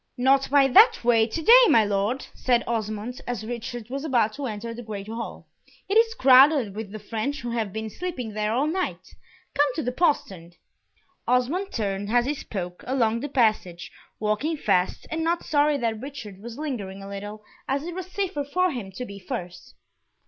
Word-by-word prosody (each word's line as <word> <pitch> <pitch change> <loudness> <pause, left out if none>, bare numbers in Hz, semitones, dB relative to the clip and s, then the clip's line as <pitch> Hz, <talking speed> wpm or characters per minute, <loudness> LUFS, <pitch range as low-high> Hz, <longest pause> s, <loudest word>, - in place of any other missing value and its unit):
"Not 270 +2 +3
by 280 0 +5
that 435 - +6
way, 230 -2 +4
to 320 +8 -4
day, - - +9
my 225 - +5
Lord," 205 +6 -1
said 240 -2 +1
Osmond, 220 +1 -3
as 240 -3 -3
Richard 240 0 -6
was 275 +1 -3
about 240 -8 +1
to 280 +1 -4
enter 225 +1 -5
the 235 - -8
great 210 -3 -7
hall. 230 +1 -6 0.4
"It 395 - -1
is 455 0 +4
crowded 260 -4 +5
with 215 -2 -6
the 215 - -6
French 225 +7 -4
who 240 0 -4
have 225 -4 -2
been 220 +2 -4
sleeping 250 - -5
there 210 0 -1
all 255 +6 +1
night; 360 +4 -2 0.5
come 290 0 +3
to 315 - -2
the 250 - -1
postern." 195 - -1 0.7
Osmond 280 +11 +1
turned, 200 -2 -2
as 240 0 +3
he 285 - 0
spoke, 180 -10 -6
along 235 -3 +1
the 290 +4 -5
passage, 215 -9 0 0.3
walking 220 +10 -1
fast, 180 -9 0
and 320 0 -1
not 335 +1 0
sorry 295 0 +2
that 225 -4 -2
Richard 245 -9 -8
was 235 +1 -8
lingering 205 -10 -5
a - - -8
little, 205 +2 -7 0.2
as 275 +2 -1
it 345 +1 -5
was 370 0 -6
safer 370 -6 -2
for 365 +6 +1
him 220 -7 -6
to 250 - -5
be 200 -3 -9
first. 180 -1 -7
240 Hz, 190 wpm, -25 LUFS, 215-285 Hz, 0.7 s, day